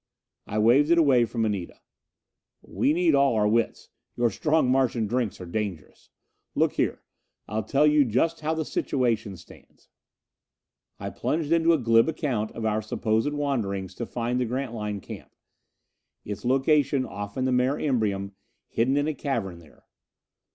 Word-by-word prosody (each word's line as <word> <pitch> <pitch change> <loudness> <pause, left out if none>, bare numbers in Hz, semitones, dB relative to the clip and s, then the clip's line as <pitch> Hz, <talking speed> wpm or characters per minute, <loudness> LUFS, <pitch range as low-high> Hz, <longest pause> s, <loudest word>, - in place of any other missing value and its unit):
I 105 - -3
waved 120 +8 +4
it 170 - +5
away 135 -7 +4
from 115 -1 -2
Anita. 100 -5 -4 0.8
"We 145 - 0
need 170 0 +2
all 140 -3 +3
our 105 -1 +2
wits; 115 +2 0 0.3
your 120 -1 +1
strong 155 +6 +1
Martian 125 -3 +1
drinks 120 0 -2
are 90 - -7
dangerous. 95 -2 -5 0.5
Look - - +2
here, - - -1 0.4
I'll 110 +1 -2
tell 140 +6 +2
you 150 -1 +5
just 135 +8 0
how 155 +1 -1
the 160 -1 -2
situation 115 -10 -1
stands - - -18 0.5
" - - -56
I - - -5
plunged 155 0 -2
into 165 0 +4
a 165 - +4
glib 115 0 +3
account 130 -9 -2
of 115 - -5
our 110 0 +1
supposed 110 +4 -1
wanderings 105 -11 -2
to 120 - -6
find 120 +1 -2
the 125 - +1
Grantline 115 -5 -4
camp; - - -11 0.9
its 105 -1 -6
location 135 +1 +2
off 100 +2 -7
in 130 - 0
the 130 - +1
Mare 125 +2 +2
Imbrium 105 -8 -1 0.4
hidden 130 +5 +1
in 145 +1 +1
a 155 - 0
cavern 115 - -3
there. 80 -4 -20
120 Hz, 160 wpm, -26 LUFS, 105-145 Hz, 0.9 s, it